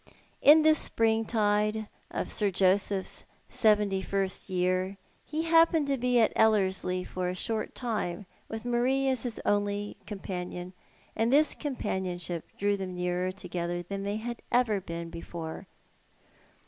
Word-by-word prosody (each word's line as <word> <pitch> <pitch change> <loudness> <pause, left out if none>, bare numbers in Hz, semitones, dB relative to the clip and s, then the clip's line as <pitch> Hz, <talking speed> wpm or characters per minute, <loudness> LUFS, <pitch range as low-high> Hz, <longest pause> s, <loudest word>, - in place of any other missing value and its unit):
In 305 +2 +8
tliis 310 0 +6
springtide 220 -1 +1 0.2
of - - -3
Sir 205 -2 +1
Joseph's 190 +1 +1 0.3
seventy 210 -3 +2
first 195 0 -2
year, 185 +1 0 0.3
ho 310 +1 0
happened 330 -1 +4
to 275 - +3
be 250 0 +3
at 220 - +3
lilllerslie 190 -4 +2
for 180 -1 -3
a 180 - -3
short 220 +3 -2
time, 215 -5 -3 0.2
with 220 0 -5
^larie 245 +3 +1
as 255 -3 -1
his 240 -3 -3
only 205 0 0
companion, 180 -3 -5 0.4
and 225 +2 +1
tliis 300 +3 +4
companionship 180 - -3
drew 205 0 +1
them 185 -2 -5
nearer 180 +1 -1
together 175 -2 -4
than 195 +3 -5
they 200 +1 -2
had 235 +1 -5
ever 235 -5 +2
been 170 -2 -6
before. 170 +1 -7
205 Hz, 135 wpm, -29 LUFS, 185-230 Hz, 0.4 s, In